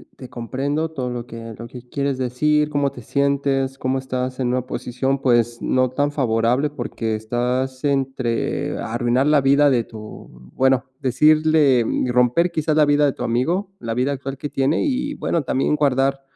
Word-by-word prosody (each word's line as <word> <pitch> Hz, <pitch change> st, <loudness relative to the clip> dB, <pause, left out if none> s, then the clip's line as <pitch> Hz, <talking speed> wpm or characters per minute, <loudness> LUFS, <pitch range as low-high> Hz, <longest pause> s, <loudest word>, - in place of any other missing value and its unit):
te 130 Hz, -, -11 dB
comprendo 135 Hz, +6 st, -2 dB
todo 130 Hz, -5 st, -4 dB
lo 120 Hz, -1 st, -5 dB
que 115 Hz, -1 st, -8 dB
lo 115 Hz, -, -7 dB
que 125 Hz, +1 st, -12 dB
quieres 140 Hz, 0 st, -2 dB
decir, 150 Hz, +4 st, +1 dB
cómo 145 Hz, -2 st, 0 dB
te 125 Hz, -, -11 dB
sientes, 140 Hz, 0 st, 0 dB
cómo 130 Hz, 0 st, -1 dB
estás 130 Hz, 0 st, -4 dB
en 125 Hz, -, 0 dB
una 125 Hz, 0 st, -1 dB
posición, 130 Hz, +2 st, -2 dB
pues, 120 Hz, -2 st, +2 dB
no 130 Hz, 0 st, +1 dB
tan 145 Hz, +3 st, 0 dB
favorable, 125 Hz, +1 st, +1 dB
porque 115 Hz, -4 st, -3 dB
estás 125 Hz, +4 st, -2 dB
entre 135 Hz, -4 st, -1 dB
arruinar 120 Hz, +4 st, 0 dB
la 150 Hz, -1 st, +4 dB
vida 140 Hz, +2 st, +4 dB
de 120 Hz, -3 st, +2 dB
tu 110 Hz, -1 st, -11 dB, 0.3 s
bueno, 130 Hz, 0 st, +2 dB, 0.2 s
decirle 150 Hz, -1 st, +4 dB
y 125 Hz, -, -1 dB
romper 125 Hz, +8 st, +2 dB
quizás 155 Hz, -1 st, 0 dB
la 150 Hz, -, +6 dB
vida 145 Hz, 0 st, +3 dB
de 140 Hz, -, +1 dB
tu -, -, -6 dB
amigo, 165 Hz, -, 0 dB
la 115 Hz, -1 st, -4 dB
vida 130 Hz, +4 st, 0 dB
actual 135 Hz, 0 st, -6 dB
que 145 Hz, -, -5 dB
tiene 135 Hz, +4 st, +1 dB
y, 285 Hz, +1 st, -1 dB
bueno, 165 Hz, -, -1 dB
también 135 Hz, +3 st, 0 dB
guardar 135 Hz, -1 st, +1 dB
130 Hz, 175 wpm, -21 LUFS, 125-145 Hz, 0.3 s, la